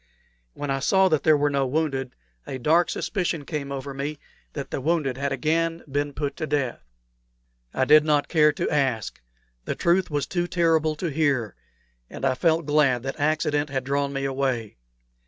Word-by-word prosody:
When 145 -1 -3
I 135 - 0
saw 190 +7 +3
that 155 -4 +2
there 155 -1 +4
were 145 0 +1
no 140 -1 +1
wounded, 135 -3 -2 0.3
a 130 - -4
dark 160 +7 +3
suspicion 175 -7 -2
came 140 -3 -4
over 140 0 -5
me 140 +3 -4 0.4
that 140 -2 -6
the - - -3
wounded 150 -3 0
had 140 +1 -2
again 165 +5 0
been 145 +1 -1
put 145 0 -3
to 155 - -3
death. 140 -5 -1 0.9
I 130 - 0
did 150 +2 +7
not 150 -2 +2
care 150 -2 +4
to 145 - -3
ask. 130 -7 -1 0.4
The - - -2
truth 175 +2 +2
was 145 -2 -1
too 175 +2 -2
terrible 165 -3 +2
to 165 +1 -3
hear, 135 -8 0 0.6
and - - -5
I 130 - +3
felt 160 +4 +1
glad 140 -5 +2
that 135 +2 -5
accident 150 0 +1
had 135 -1 -2
drawn 140 +1 -1
me 135 0 -3
away. 130 - -2
145 Hz, 180 wpm, -25 LUFS, 135-155 Hz, 0.9 s, did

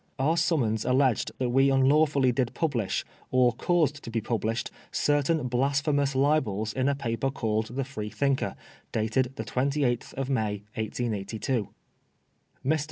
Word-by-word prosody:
Our 150 +5 +2
summons 140 -10 +1
alleged 130 -2 +2
that 125 -2 -1
we 135 +2 +4
un 135 -1 +4
lawfully 145 -3 +4
did 125 -1 -1
publish, 130 - -1 0.2
or 125 -2 +4
caused 150 +1 +1
to - - -7
be 115 0 -1
published, 115 +1 -2 0.2
certain 145 0 +1
blasphemous 140 +2 +1
libels 120 -7 +1
in 130 +1 +1
a 140 - +1
newspaper 135 -1 -1
called 110 -2 -2
the 135 - 0
Freethinker^ 130 +1 -1 0.4
dated 115 +4 0
the 110 - -5
28th 130 0 0
of 135 -1 -2
May, 110 -6 -1
1882. 110 0 -2 1.0
Mr. 155 +3 +2
130 Hz, 140 wpm, -27 LUFS, 115-140 Hz, 1.0 s, we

